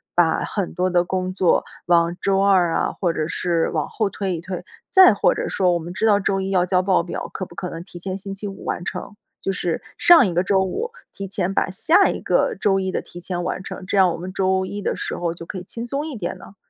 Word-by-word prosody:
把 170 -2 +3
很 200 -4 -3
多 185 +1 +1
的 175 0 +3
工 185 0 -2
作 185 -2 +2 0.2
往 170 0 +3
周 195 -1 +2
二 185 -4 +4
啊 - - 0
或 175 -3 0
者 155 -1 -2
是 170 -1 0
往 155 -3 -1
后 215 -3 -1
推 190 -2 -2
一 - - -7
推？ 185 0 -6 0.3
再 375 - +8
或 - - +3
者 - - -3
说， 185 -2 +2
我 170 - 0
们 170 +1 -7
知 220 - -1
道 205 -2 +5
周 195 -1 0
一 190 0 -3
要 180 -2 +3
交 180 0 +3
报 185 -2 +3
表， 175 - -5
可 185 - -4
不 170 - -15
可 180 - -4
能 165 +1 -7
提 175 - -12
前 190 +1 -4
星 195 0 -7
期 205 +1 -6
五 195 - -8
完 175 - -3
成？ 205 - -6 0.3
就 195 - -1
是 175 -3 -2 0.2
上 345 -10 +7
一 180 - -2
个 175 +2 +2
周 195 0 +2
五 440 - -2 0.2
提 195 - -6
前 195 -1 -2
把 - - +1
下 340 - +4
一 - - -3
个 - - +1
周 195 -2 +2
一 190 - -2
的 - - -2
提 175 - -12
前 175 0 -3
完 185 - -3
成， 185 - -7
这 190 - -1
样 185 -2 +5
我 - - -4
们 180 +2 -7
周 190 0 +1
一 205 +2 -5
的 - - -1
时 - - -3
候 170 -1 -1
就 170 0 -10
可 190 - -6
以 180 - -6
轻 230 +5 -6
松 280 +4 -2
一 295 - -6
点 175 -5 -4
呢？ 200 - -14
185 Hz, 285 characters per minute, -22 LUFS, 175-195 Hz, 0.3 s, 再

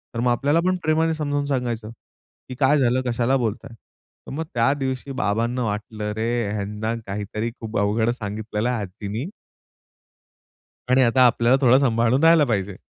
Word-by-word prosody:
तर - - -2
मग 120 +1 +2
आपल्याला 145 +6 +2
पण 185 0 +2
प्रेमाने 160 +1 +2
समजावून 145 -2 -2
सांगायचं, 120 -5 -2 0.6
की 130 - -6
काय 140 +2 +4
झालं, 130 -2 +2
कशाला 120 +2 +1
बोलताय?" 115 -2 -3 0.5
तर - - -7
मग 155 +4 -3
त्या 120 +3 +3
दिवशी 135 -1 -4
बाबांना 120 0 -1
वाटलं, 105 0 -4
अरे 110 0 -1
ह्यांना 105 +2 -3
काहीतरी 105 +3 -4
खूप 110 -1 -5
अवघड 105 +3 +1
सांगितलेलं 105 +1 -3
आहे 120 -3 -1
आजीनी 100 +5 -5 1.6
आणि 130 +1 +4
आता 125 +2 +4
आपल्याला 120 +2 +3
थोडं 130 -1 +6
सांभाळून 120 +1 +2
राहायला 165 -1 +6
पाहिजे. 100 -5 -2
120 Hz, 155 wpm, -23 LUFS, 110-135 Hz, 1.6 s, थोडं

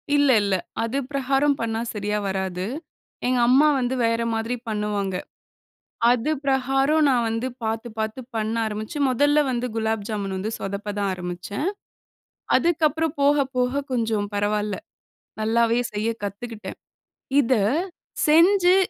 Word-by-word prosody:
இல்ல 285 -1 +4
இல்ல. 200 -1 +1 0.3
அது 230 +4 -2
பிரகாரம் 275 +1 +2
பண்ணா 225 0 -1
சரியா 210 0 -1
வராது. 190 -1 -2 0.6
எங்க 250 0 +2
அம்மா 270 +5 +6
வந்து 250 +1 0
வேற 230 0 +1
மாதிரி 225 +2 -1
பண்ணுவாங்க. 210 -3 -1 1.0
அது 245 +4 +1 0.2
பிரகாரம் 270 +3 +2
நான் 245 -4 +3
வந்து 225 +3 -1 0.2
பாத்து 225 +1 -2
பாத்து 220 +3 -2
பண்ண 220 0 -1
ஆரம்பிச்சு, 215 +5 -4
மொதல்ல 290 +4 +3
வந்து 245 -1 -1
குலாப் 220 -2 -1
ஜாமுன் 200 -3 -3
வந்து 200 +4 -3
சொதப்ப 200 +1 -4
தான் 200 -1 0
ஆரம்பிச்சேன். 180 - -4 0.9
அதுக்கப்புறம் 320 -2 +1
போக 285 0 +4
போக 250 +3 +1
கொஞ்சம் 225 -4 0
பரவால்ல, 205 0 0 0.7
நல்லாவே 230 +2 +2
செய்ய 210 +2 0
கத்துக்கிட்டேன். 210 0 -6 0.6
இத 260 -2 +3 0.7
செஞ்சு, 355 +4 +6
230 Hz, 125 wpm, -24 LUFS, 210-270 Hz, 1.0 s, அம்மா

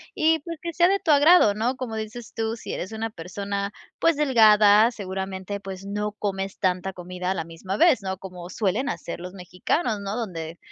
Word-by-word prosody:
y 320 +1 +3
pues, 335 +1 -7
que 340 - -4
sea 345 +2 +4
de 395 +1 +2
tu 315 - +2
agrado, 290 - +6
¿no?, 230 +5 -1
como 240 -4 -5
dices 220 +2 -7
tú, 225 0 -2
si - - -8
eres 185 +5 -5
una 225 +1 -3
persona, 200 +2 -4 0.3
pues 330 -1 +3
delgada, 220 -5 +6
seguramente, 190 -1 -5
pues, 195 -1 -8
no 205 +1 -3
comes 195 -2 -3
tanta 185 +1 -1
comida 180 +1 -4
a - - +2
la 165 - -3
misma 170 +4 -6
vez, 305 -2 +4
¿no?, 190 -1 -3
como 180 -2 -9
suelen 220 +7 -1
hacer 170 - -4
los 180 +1 -8
mexicanos, 195 - -2
¿no?, 200 +1 -4
donde, 170 -8 -5
205 Hz, 195 wpm, -24 LUFS, 190-235 Hz, 0.3 s, agrado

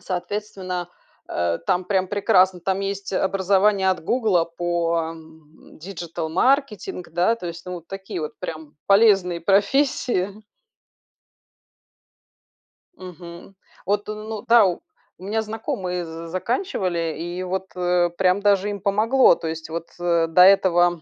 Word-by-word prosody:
соответственно, 185 -1 -4 0.4
э, 85 -1 -1
там 185 -1 +1
прям 190 -1 0
прекрасно, 190 -3 +3
там 190 +2 -1
есть 195 0 -4
образование 195 +1 +2
от 185 - -2
"Гугла" 210 -8 +2
по, 170 0 -1
м, 160 -1 -17
диджитал-маркетинг, 180 - -1
да, 175 +7 +2
то 180 -6 -8
есть, 170 +1 -8
ну, 180 - -5
вот 170 -1 -10
такие 195 -3 -6
вот 150 - -6
прям 155 -2 -8
полезные 195 -4 +4
профессии. 205 - +1 2.6
Мгм. 175 +1 -11 0.3
Вот, 205 +1 -1
ну 215 0 -6
да. 230 -2 +7
У 180 -2 -1 0.4
у 185 - -15
меня 220 +3 -1
знакомые 215 -5 -4
з 165 +1 -8
заканчивали 185 - -2
и 175 +2 -5
вот, 190 +1 -3
э, 180 -1 +2
прям 190 +1 +2
даже 200 0 +2
им 200 -2 -5
помогло. 215 +3 +4
То 165 -1 -6
есть 160 0 -6
вот, 165 +1 -5
э, 170 -1 +1
до 165 +2 +4
этого 175 -3 +5
185 Hz, 130 wpm, -22 LUFS, 170-200 Hz, 2.6 s, да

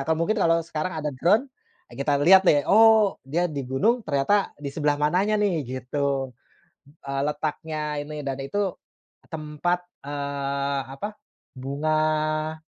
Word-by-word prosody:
kalau 160 0 +1
mungkin 215 +3 0
kalau 165 -1 +3
sekarang 165 +1 -4
ada 150 -1 -2
drone, 180 - +3 0.5
eee, - - -11
kita 145 +1 +2
lihat 190 +1 +7
deh, 145 -2 +4
oh 220 -1 +6
dia 170 +6 0
di 145 -2 -4
gunung 220 - +2
ternyata 150 +8 +1
di 140 - -1
sebelah 145 -1 +1
mananya 180 +8 +1
nih 205 - +2 0.2
gitu. 135 +1 -2 0.7
Eee, 140 0 -2
letaknya 155 +1 -3 0.2
ini 150 0 -6
dan 135 0 -2
itu 205 +9 -3 0.7
tempat, 160 +3 -2 0.3
eee, 140 -1 -2 0.2
apa, 205 - -4 0.5
bunga 155 +3 -1
155 Hz, 135 wpm, -25 LUFS, 140-175 Hz, 0.7 s, lihat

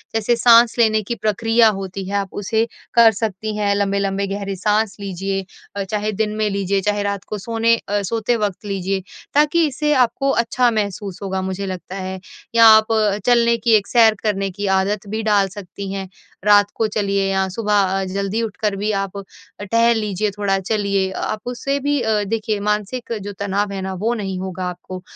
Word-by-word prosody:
जैसे 225 +2 +2
साँस 235 0 +5
लेने 220 -2 +4
की 235 +4 -3
प्रक्रिया 225 +1 +3
होती 190 0 -6
है 200 - -2
आप 195 -2 -3
उसे 220 +3 0 0.3
कर 230 -1 +7
सकती 215 0 -3
हैं, 200 -1 +1
लंबे-लंबे 200 0 0
गहरे 200 0 -4
साँस 210 +2 0
लीजिए। 195 0 -3 0.3
अ, 200 - -2
चाहे 210 +2 -2
दिन 215 +1 -2
में 215 -1 0
लीजिए, 195 0 0
चाहे 205 +1 0
रात 200 -1 -2
को 210 - -4
सोने 230 +3 +1
अ, 205 0 +1
सोते 230 +4 0
वक़्त 210 -1 -3
लीजिए। 195 -1 -2 0.3
ताकि 300 +3 +3
इससे 300 +2 0
आपको 275 +4 -2 0.2
अच्छा 245 0 +2
महसूस 200 -3 -3
होगा 190 -1 -2
मुझे 190 +1 -3
लगता 185 0 -6
है। 190 -1 -5 0.4
या 230 0 +7
आप 220 +1 +1 0.4
चलने 235 -1 +4
की, 230 0 0
एक 205 -2 +1
सैर 225 -3 +5
करने 205 -2 0
की 205 0 -3
आदत 195 +2 0
भी 220 +1 -2
डाल 205 -2 +3
सकती 195 0 -8
हैं। 195 -1 -4 0.4
रात 205 -1 +5
को 225 - +1
चलिए 200 -2 0
या 190 0 +1
सुबह 200 -2 +1
ज़ल्दी 195 +3 -2
उठकर 210 -1 -2
भी 205 +2 -1
आप 195 -1 -3
अ, 200 - -6 0.4
टहल 230 +3 +3
लीजिए 210 -1 -1
थोड़ा 195 -1 0
चलिए। 200 -1 0
अ, - - -6
आप 215 - -2
उससे 275 +3 -2
भी 285 0 0
अ, 220 -2 +1
देखिए 215 0 -2
मानसिक 210 +4 -2
जो 205 +1 -6
तनाव 200 0 -1
है 190 - -4
ना 190 0 -4
वो 230 +3 +1
नहीं 195 -5 -4
होगा 185 0 -4
आपको। 180 +1 -8
205 Hz, 190 wpm, -20 LUFS, 195-220 Hz, 0.4 s, कर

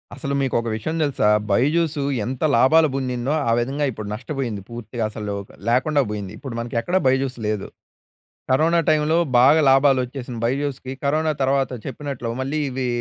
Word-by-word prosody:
అసలు 140 -3 -4
మీకు 135 -2 -1
ఒక 115 - -4
విషయం 155 +9 -3
తెలుసా? 140 -7 +1 0.2
'బైజుసు' 145 +5 +1 0.2
ఎంత 130 +1 -5
లాభాలు 155 +6 +5
పొందిందో 130 +1 -1 0.2
ఆ - - +3
విధంగా 140 +4 -1
ఇప్పుడు 110 -3 -7
నష్టపోయింది 120 -2 -4
పూర్తిగా. 115 0 -5
అసలు 105 -1 -5 0.4
లేకుండా 140 +4 +2
పోయింది. 100 -2 -5
ఇప్పుడు 130 -4 -7
మనకి 120 +1 -5
ఎక్కడా 185 +6 +1
'బైజుస్' 130 -1 +1
లేదు. 105 -2 -2 0.8
కరోనా 165 +5 +3
టైమ్‌లో 155 +1 +3 0.2
బాగా 145 +6 +6
లాభాలోచ్చేసినయి 130 -3 +1
'బైజుస్‌కి', 135 0 -2
కరోనా 155 +2 +1
తర్వాత 135 0 +1
చెప్పినట్లు 135 -3 -5
మళ్ళీ 140 +4 -2
ఇవి 130 0 -3
135 Hz, 150 wpm, -22 LUFS, 120-145 Hz, 0.8 s, బాగా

